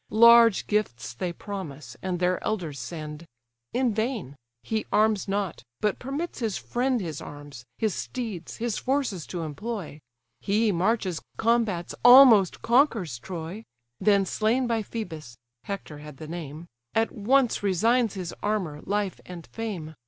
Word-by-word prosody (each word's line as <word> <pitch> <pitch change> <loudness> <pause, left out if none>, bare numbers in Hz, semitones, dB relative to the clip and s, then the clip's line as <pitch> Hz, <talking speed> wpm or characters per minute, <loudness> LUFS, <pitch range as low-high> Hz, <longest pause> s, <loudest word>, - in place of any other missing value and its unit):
Large 235 -1 +7
gifts 200 - -1
they 175 +9 -3
promise, 155 - -7
and 185 -2 -2
their 180 0 +1
elders 170 -10 -2
send; 155 +4 -7 0.4
In 250 -3 +1
vain—he 205 - -4
arms 215 -1 +2
not, 195 -3 -2 0.2
but 210 -2 0
permits 280 +7 -4
his 220 -6 -1
friend 250 +1 0
His 160 -7 -5
arms, 145 -4 -10
his 215 -4 0
steeds, 220 -9 -5
his 235 -2 -2
forces 260 - -1
to 175 -2 -4
employ: 180 +1 -5 0.4
He 210 +2 +2
marches, 185 -1 0 0.2
combats, 225 -7 +1
almost 245 -6 +8
conquers 230 - +2
Troy: 175 - -6 0.4
Then 200 0 +4
slain 225 +7 +1
by 230 -2 0
Phœbus 160 - -7 0.3
(Hector 190 -7 -6
had 150 -2 -11
the 155 - -8
name) 160 -1 -7 0.3
At 225 0 +2
once 245 +4 +2
resigns 220 +4 +2
his 180 -3 -5
armour, 185 -8 -2
life, 205 -1 -1
and 175 -2 -8
fame. 195 -9 -5
200 Hz, 135 wpm, -26 LUFS, 165-225 Hz, 0.4 s, almost